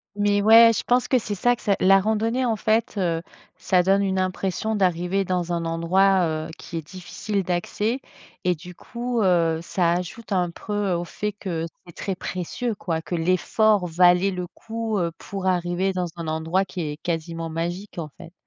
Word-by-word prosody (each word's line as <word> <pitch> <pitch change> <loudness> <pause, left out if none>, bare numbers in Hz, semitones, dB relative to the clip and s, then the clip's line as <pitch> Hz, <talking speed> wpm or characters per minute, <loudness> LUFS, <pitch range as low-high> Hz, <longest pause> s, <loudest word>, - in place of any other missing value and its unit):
Mais 205 0 +2
ouais, 230 +1 +8
je - - -2
pense 245 0 +2
que 255 - +3
c'est 215 -3 -3
ça 245 +5 +2
que - - -17
ça 200 -2 +2
la 195 +1 +6
randonnée 225 +5 0
en 230 - +1
fait, 220 +1 0
heu, 170 -2 0 0.3
ça 180 -1 +2
donne 195 +2 +3
une 190 -1 0
impression 190 +3 -1
d'arriver 185 0 +1
dans 175 -1 -1
un 170 -1 -1
endroit, 180 +3 +3 0.2
heu, - - -8
qui 170 - -7
est 160 - -5
difficile 195 +2 -4
d'accès 205 +7 -1 0.4
et 180 0 +3
du 180 +2 -11
coup, 240 0 -3
heu, 165 -3 +3
ça 170 -1 +1
ajoute 180 +5 -5
un 180 -2 +1
preux 205 0 -2
au 170 0 -1
fait 210 +4 -4
que 175 -5 -4 0.2
c'est 170 - -12
très 195 - -3
précieux 185 +6 -4
quoi. 165 -4 -3
Que 175 - -4
l'effort 185 +3 +2
valait 180 +3 +4
le 180 -1 -3
coup, 225 +3 -4
heu, 170 -2 0
pour 195 -2 -5
arriver 180 +1 0
dans 180 -1 -1
un 170 -1 -6
endroit 160 +4 0
qui 185 -2 -6
est 150 -1 -4
quasiment 165 0 -3
magique 175 +5 -4
en 160 -3 -4
fait. 165 - -11
185 Hz, 190 wpm, -24 LUFS, 170-205 Hz, 0.4 s, ouais